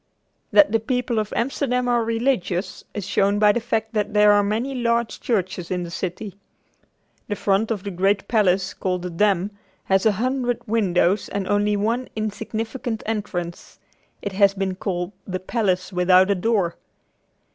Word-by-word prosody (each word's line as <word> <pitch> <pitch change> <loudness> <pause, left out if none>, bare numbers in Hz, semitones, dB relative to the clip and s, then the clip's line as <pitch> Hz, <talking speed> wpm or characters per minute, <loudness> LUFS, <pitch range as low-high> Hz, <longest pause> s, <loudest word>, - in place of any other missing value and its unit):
That 300 -8 +6
the 225 - +3
people 245 0 -1
of 215 -1 -3
Amsterdam 250 0 0
are 240 -1 +2
religious 225 -5 -1
is 205 -3 -3
shown 200 +1 +2
by 210 0 +5
the 240 - 0
fact 225 -1 -2
that 210 -1 -1
there 210 0 +6
are 205 0 +5
many 220 +7 -1
large 235 -2 0
churches 190 -6 -1
in 180 -1 -1
the 170 - -7
city. 185 +3 -4 0.9
The 205 - -2
front 200 +2 +1
of 210 -5 -2
the 200 - -4
great 195 +2 +1
palace 195 -4 +2
called 180 -2 -2
the 180 - -4
Dam 195 +2 +1 0.3
has 190 +2 +2
a 215 - +4
hundred 245 +2 -1
windows 195 -3 +1
and 200 -2 -3
only 205 +1 +2
one 225 +4 +1
little - - -23
insignificant 220 +2 -4
entrance. 190 -6 -4 0.5
It 200 - -3
has 200 0 +3
been 195 -1 -1
called 180 -1 -3 0.2
"the 185 -1 -3
palace 185 -2 -1
without 185 +2 +4
a - - +3
door." 190 -3 0
205 Hz, 170 wpm, -23 LUFS, 190-225 Hz, 0.9 s, That